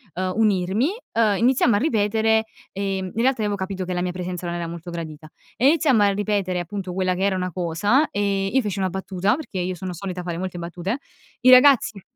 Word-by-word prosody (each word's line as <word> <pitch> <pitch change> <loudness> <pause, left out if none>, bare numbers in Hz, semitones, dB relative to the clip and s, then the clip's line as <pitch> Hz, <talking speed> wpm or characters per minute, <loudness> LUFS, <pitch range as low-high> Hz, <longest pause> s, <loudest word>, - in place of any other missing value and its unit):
uhm, 185 +1 -2
unirmi", 205 +2 +2 0.3
ehm, 215 -3 +2
iniziamo 245 -1 +3
a - - +3
ripetere, 220 -3 +1 0.3
ehm. 195 -1 -3
In 230 - -1
realtà 255 -1 +2
avevo 205 -1 0
capito 190 -1 -4
che 180 - -3
la 175 - -1
mia 180 0 -1
presenza 180 0 -5
non 170 - -3
era 170 -1 -3
molto 170 +1 -8
gradita. 160 -2 -7 0.3
E 235 +6 +3
iniziamo 280 -7 +4
a 205 - +5
ripetere 200 -2 -1
appunto 185 +1 -5
quella 185 0 0
che 185 +1 -2
era 195 -1 +2
una 180 0 -2
cosa, 185 - +1
ehm, 195 -1 -1
io 265 - +5
feci 205 -4 -3
una 190 -1 0
battuta, 190 +2 -1
perché 275 -10 -6
io 180 +1 -2
sono 180 +1 -6
solita 180 0 -5
fare 175 -1 -4
molte 185 -1 -4
battute. 175 +6 -4 0.4
I 255 0 +6
ragazzi 255 -6 +6
195 Hz, 210 wpm, -23 LUFS, 180-215 Hz, 0.4 s, I